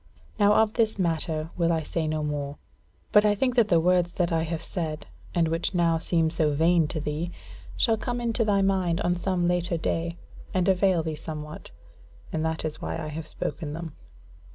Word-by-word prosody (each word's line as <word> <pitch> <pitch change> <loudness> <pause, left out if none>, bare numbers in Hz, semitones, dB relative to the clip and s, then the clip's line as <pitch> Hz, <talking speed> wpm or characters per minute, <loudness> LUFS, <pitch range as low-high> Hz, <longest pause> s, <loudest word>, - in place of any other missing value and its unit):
Now 205 0 +6
of 220 -1 +3
this 220 -3 +1
matter 160 -3 -1
will 170 -1 +2
I 160 -1 0
say 160 0 -2
no 155 0 -1
more; 145 -1 -3 0.5
but 210 - +6
I 210 -1 +3
think 250 +4 +1
that 235 -4 +4
the 170 -5 +4
words 175 0 +2
that 175 -2 0
I 165 -1 +2
have 165 0 -3
said, 160 -4 -4 0.3
and 170 -2 +3
which 165 +3 -1
now 165 -2 +3
seem 165 -1 +1
so 155 -3 +1
vain 165 +1 +4
to 155 +1 -3
thee, 150 +3 -3 0.5
shall 225 -3 +3
come 245 +2 -3
into 235 -1 0
thy 200 -2 +2
mind 185 -3 +1
on 175 0 +1
some 180 0 0
later 175 0 +1
day, 170 +1 -2 0.4
and 185 0 +2
avail 185 -3 +3
thee 160 -1 -2
somewhat; 150 0 -7 0.6
and 160 - 0
that 160 0 -2
is 155 - -4
why 80 0 -3
I 155 - -4
have 155 +1 -6
spoken 150 -2 -2
them. 165 -1 -6
170 Hz, 200 wpm, -26 LUFS, 160-185 Hz, 0.6 s, Now